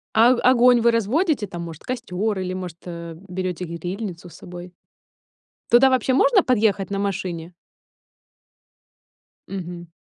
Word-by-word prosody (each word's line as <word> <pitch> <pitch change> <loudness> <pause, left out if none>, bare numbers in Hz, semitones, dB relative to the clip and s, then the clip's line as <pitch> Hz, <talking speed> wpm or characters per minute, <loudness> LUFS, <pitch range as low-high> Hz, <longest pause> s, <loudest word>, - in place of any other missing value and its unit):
А 230 +2 +6
огонь 245 0 +5
вы 235 +1 +4
разводите 230 - +1
там, 175 -3 -7
может, 165 -2 -9
костёр 220 -4 -2
или, 185 -1 -3
может, 180 -3 -6
э, 170 -1 -7
берёте 180 -1 -3
грильницу 175 +2 -6
с 160 - -15
собой? 175 0 -10 1.0
Туда 255 +3 +6
вообще 260 0 +1
можно 415 - +4
подъехать 215 -5 +1
на 200 0 -2
машине? 180 -4 -3 2.0
Мгм. 175 -2 -7
195 Hz, 125 wpm, -22 LUFS, 175-235 Hz, 2.0 s, А